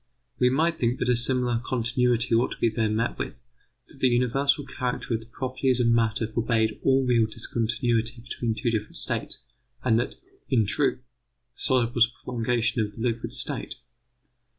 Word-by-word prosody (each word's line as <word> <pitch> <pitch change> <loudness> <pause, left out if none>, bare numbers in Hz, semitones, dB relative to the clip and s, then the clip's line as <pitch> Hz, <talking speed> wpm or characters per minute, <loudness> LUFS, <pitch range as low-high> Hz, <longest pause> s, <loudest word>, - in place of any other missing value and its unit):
We 125 - +5
might 160 +5 +1
think 120 +1 +1
that 125 - -1
a 125 - +4
similar 120 -1 +1
continuity 125 0 +1
ought 115 +2 +2
to - - -12
be 115 - +2
there 110 0 0
met 110 +3 -1
with, 120 - -5 0.4
that 140 - -17
the 130 - +4
universal 130 +4 +2
character 125 -3 -3
of 110 - 0
the 115 - -14
properties 130 +1 -1
of 120 - +2
matter 115 -1 +2
forbade 110 -1 0
all 135 0 +3
real 120 -3 +3
discontinuity 115 +1 -1
between 115 -1 -3
two 120 - -1
different 110 -2 -3
states, - - -4 0.4
and 115 -2 +3
that, 120 - -2 0.3
in 115 -5 +3
truth, 130 +4 +1 0.5
the - - -19
solid 125 -4 +2
was 120 -1 +5
a 120 - -23
prolongation 115 -1 0
of 105 -1 -3
the - - -8
liquid 120 -2 -1
state. - - -4
120 Hz, 175 wpm, -26 LUFS, 115-125 Hz, 0.5 s, We